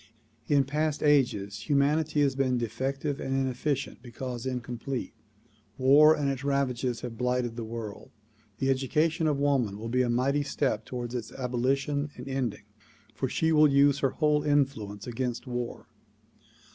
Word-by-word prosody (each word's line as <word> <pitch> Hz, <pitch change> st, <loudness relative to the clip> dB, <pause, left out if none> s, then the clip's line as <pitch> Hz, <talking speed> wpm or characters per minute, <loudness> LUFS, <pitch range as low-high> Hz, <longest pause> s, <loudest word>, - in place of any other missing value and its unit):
In 145 Hz, -2 st, +4 dB
past 150 Hz, +2 st, -1 dB
ages 105 Hz, -9 st, +1 dB
humanity 145 Hz, +2 st, +2 dB
has 140 Hz, -2 st, +2 dB
been 130 Hz, -2 st, +1 dB
defective 135 Hz, +4 st, -2 dB
and 135 Hz, -, -2 dB
inefficient 135 Hz, +1 st, -2 dB
because 125 Hz, 0 st, -6 dB
incomplete. 125 Hz, +1 st, -4 dB, 0.6 s
War 145 Hz, +4 st, +6 dB
and 145 Hz, -, -1 dB
its 135 Hz, -1 st, -2 dB
ravages 130 Hz, -3 st, 0 dB
have 115 Hz, -2 st, -7 dB
blighted 125 Hz, -2 st, 0 dB
the 115 Hz, -, -4 dB
world. 110 Hz, -2 st, -7 dB, 0.5 s
The 135 Hz, +2 st, +1 dB
education 155 Hz, +5 st, +1 dB
of 150 Hz, -2 st, +1 dB
woman 135 Hz, -8 st, +1 dB
will 115 Hz, +2 st, -6 dB
be 125 Hz, +2 st, +2 dB
a 125 Hz, -, +1 dB
mighty 135 Hz, +4 st, +1 dB
step 140 Hz, -1 st, -1 dB
toward 120 Hz, -1 st, -5 dB
its 120 Hz, -3 st, -4 dB
abolition 135 Hz, +3 st, -1 dB
and 125 Hz, +2 st, -8 dB
ending 130 Hz, -6 st, -2 dB, 0.5 s
for 130 Hz, -, -2 dB
she 160 Hz, +5 st, +1 dB
will 155 Hz, -1 st, +6 dB
use 140 Hz, 0 st, +4 dB
her 135 Hz, -, +2 dB
whole 150 Hz, +1 st, +1 dB
influence 135 Hz, -9 st, 0 dB
against 125 Hz, +1 st, -3 dB
war. 125 Hz, -2 st, -4 dB
135 Hz, 150 wpm, -28 LUFS, 120-145 Hz, 0.6 s, War